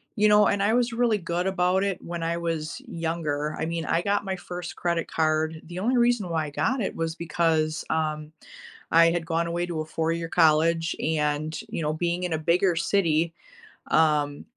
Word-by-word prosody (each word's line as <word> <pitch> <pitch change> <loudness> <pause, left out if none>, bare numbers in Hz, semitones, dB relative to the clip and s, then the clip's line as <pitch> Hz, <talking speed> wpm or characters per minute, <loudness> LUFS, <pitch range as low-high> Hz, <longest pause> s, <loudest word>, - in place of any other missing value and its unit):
you 210 0 +4
know, 210 0 +6
and 200 0 +1
I 215 +2 +2
was 240 -1 +1
really 230 -2 +2
good 175 0 -2
about 190 0 +1
it 195 -2 -1
when 170 -1 -5
I 170 +1 -1
was 165 -2 -3
younger. 160 -3 -2
I 160 - -1
mean, 165 -1 -3
I 165 - +1
got 200 +2 0
my 190 -1 -3
first 175 0 -7
credit 170 -1 -1
card 160 0 0
the 175 +2 -7
only 245 +5 +1
reason 240 -6 +2
why 160 -2 0
I - - -5
got 245 - 0
it 195 - -2
was 165 0 -2
because, 160 -2 0
um, 155 -1 -2 0.6
I 165 0 +6
had 170 -1 -2
gone 165 0 0
away 175 +1 -1
to 165 -3 -3
a - - -5
four-year 165 +1 -2
college, 165 0 +3
and, 155 0 -1
you - - -4
know, 150 0 0
being 175 +2 -1
in 180 - -2
a - - +1
bigger 170 +2 +2
city, 165 -3 +1 0.6
um, 150 -2 +2
165 Hz, 200 wpm, -26 LUFS, 160-180 Hz, 0.6 s, know